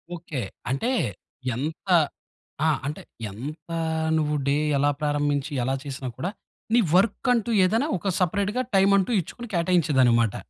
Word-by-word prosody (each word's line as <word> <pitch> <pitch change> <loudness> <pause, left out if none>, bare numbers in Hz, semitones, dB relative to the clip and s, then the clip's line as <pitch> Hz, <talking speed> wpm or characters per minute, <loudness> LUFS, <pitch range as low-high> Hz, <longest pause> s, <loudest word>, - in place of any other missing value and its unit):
Okay. 160 -6 -5 0.3
అంటే 180 - 0 0.7
ఎంత 155 +8 -4 0.8
ఆహ్, 150 -4 +3
అంటే 150 +2 -4 0.3
ఎంత 150 +10 -8 0.5
నువ్వు 150 -1 +1
డే 140 - +3 0.2
ఎలా 145 +1 +3
ప్రారంభించి 145 -1 0
ఎలా 135 +2 0
చేసినా 135 -2 -5
కూడా, 180 - -2 0.4
నీ 240 - +6
వర్క్ 200 +3 +4
కంటూ 235 -2 +2
ఏదైనా, 225 - +1
ఒక 190 +3 -1
సెపరేట్‌గా 200 +6 +1
టైమ్ 195 +1 +5
అంటూ 195 +4 +1
ఇచ్చుకు 240 +8 -10
కేటాయించేది 170 -5 +2
అన్నమాట. 115 -3 +3
155 Hz, 135 wpm, -25 LUFS, 140-195 Hz, 0.8 s, నీ